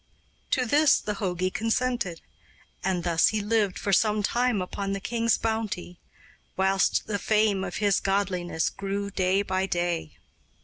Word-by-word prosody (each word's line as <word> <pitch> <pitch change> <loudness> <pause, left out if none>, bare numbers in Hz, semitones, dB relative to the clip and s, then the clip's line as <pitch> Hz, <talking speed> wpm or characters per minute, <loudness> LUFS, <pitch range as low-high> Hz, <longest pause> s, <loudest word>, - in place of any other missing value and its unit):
To 255 -2 +1
this 295 +5 +4
the 210 - -3
jogi 185 -2 -1
consented; 225 -5 -1 0.6
and 185 -2 0
thus 165 -2 +3
he 215 - 0
lived 210 -2 0
for 200 - -1
some 210 +2 +3
time 240 0 +1
upon 195 +2 -3
the 195 - -2
king's 230 +2 +1
bounty, 215 -6 -3 0.6
whilst 190 0 +2
the 205 -2 -2
fame 210 -3 +2
of 180 -2 -5
his 205 -2 +2
godliness 185 -4 -1
grew 200 +1 -4
day 190 +1 +1
by 190 -1 -1
day. 175 -3 -2
200 Hz, 145 wpm, -26 LUFS, 185-220 Hz, 0.6 s, this